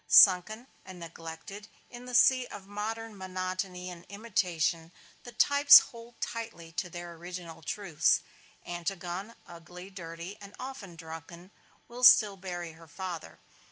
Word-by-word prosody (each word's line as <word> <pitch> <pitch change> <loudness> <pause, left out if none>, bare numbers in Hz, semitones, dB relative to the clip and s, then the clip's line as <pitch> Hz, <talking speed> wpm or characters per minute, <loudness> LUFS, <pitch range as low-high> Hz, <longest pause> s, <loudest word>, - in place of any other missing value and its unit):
Sunken 190 +5 +6 0.2
and 185 -2 -11
neglected 165 +5 -9 0.2
in 245 0 -10
the 250 -1 -4
sea 255 0 +5
of 200 -2 -10
modern 215 +2 -5
monotony 185 -1 -4
and 170 -1 -11
imitation, 180 -6 -1 0.3
the 245 - -8
types 285 +4 +8
hold 235 -2 -3
tightly 195 -8 -6
to 180 +2 -3
their 175 0 -7
original 170 -1 -8
truths. 170 -1 +1 0.4
Antigone, 180 +4 -5
ugly, 175 +3 -11
dirty 170 +1 -8
and 200 0 -11
often 255 -9 -8
drunken, 165 +2 -10 0.4
will 245 +1 -9
still 210 -5 +8
bury 175 -3 -6
her 165 +1 -16
father. 180 0 -7
185 Hz, 130 wpm, -30 LUFS, 170-215 Hz, 0.4 s, types